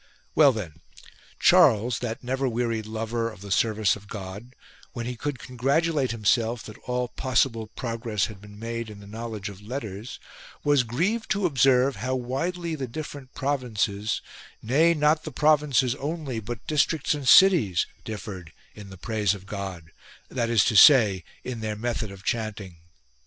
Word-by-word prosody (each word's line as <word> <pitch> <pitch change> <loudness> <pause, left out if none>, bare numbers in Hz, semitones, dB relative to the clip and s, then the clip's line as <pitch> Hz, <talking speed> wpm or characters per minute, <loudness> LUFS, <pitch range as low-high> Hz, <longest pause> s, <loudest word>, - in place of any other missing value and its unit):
Well 145 -3 +6
then, 85 - -7 0.6
Charles, 115 +3 +5
that 120 -1 -5
never 130 +1 -1
wearied 115 -2 -2
lover 115 +1 -2
of 105 -4 -13
the 100 -1 -8
service 110 -1 +2
of 100 -1 -13
God, 100 +5 -8 0.4
when 120 -1 -5
he 125 +1 -4
could 145 +3 -4
con 125 +1 -11
gratulate 140 +2 +1
himself 115 +1 +1
that 110 - -11
all 125 0 -1
possible 120 -4 0
progress 115 -3 -2
had 105 -3 -10
been 105 0 -13
made 115 +1 -5
in 105 -1 -10
the 100 - -13
knowledge 110 -1 -6
of 100 -1 -9
letters, 110 -1 -6 0.4
was 145 -2 +4
grieved 175 - -1
to 205 -2 +1
observe 135 - +3
how 130 +6 -2
widely 165 +8 -3
the 135 -4 -4
different 140 0 -8
provinces 110 -6 -1 0.2
— - - -21
nay, 155 +9 +3
not 150 +1 +3
the 155 - -6
provinces 145 -3 +3
only 140 -3 -4
but 110 +1 -7
districts 155 0 +1
and 145 -3 -1
cities 165 - +6
— - - -31
differed 100 -6 -7 0.2
in 105 -2 -11
the 95 - -11
praise 105 0 0
of 95 -1 -12
God, 95 -5 -6 0.4
that 120 -3 -1
is 115 -4 +4
to 115 - +1
say 105 - +7 0.2
in 125 -2 -5
their 110 -1 -3
method 115 0 -3
of 100 -1 -12
chanting. 105 -6 -3
115 Hz, 170 wpm, -25 LUFS, 105-135 Hz, 0.6 s, say